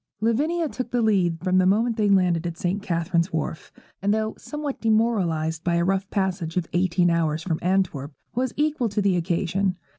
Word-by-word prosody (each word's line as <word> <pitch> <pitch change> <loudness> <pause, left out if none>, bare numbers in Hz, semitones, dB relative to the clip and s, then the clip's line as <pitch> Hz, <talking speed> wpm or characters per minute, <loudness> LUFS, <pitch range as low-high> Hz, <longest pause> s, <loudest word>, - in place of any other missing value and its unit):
Lavinia 300 +10 +1
took 255 -3 -5
the 245 -1 0
lead 185 -6 +2
from 185 0 +3
the 185 - +3
moment 225 +4 +2
they 210 -2 +1
landed 180 -3 +3
at 170 -1 -5
St. 185 +4 -1
Catherine's 170 -2 0
Warf; 160 0 -4 0.3
and 200 +1 +1
though 220 0 0
somewhat 295 -2 -5
demoralized 185 -9 +1
by 170 -1 +1
a 170 0 +2
rough 195 +1 0
passage 185 -4 -2
of 180 - +1
eighteen 175 0 +2
hours 160 -1 0
from 160 -3 -1
Antwerp, 175 -6 0 0.2
was 255 0 -1
equal 295 -5 +1
to 205 +1 -1
the 195 -2 +3
occasion. 180 +2 0
190 Hz, 185 wpm, -24 LUFS, 170-220 Hz, 0.3 s, from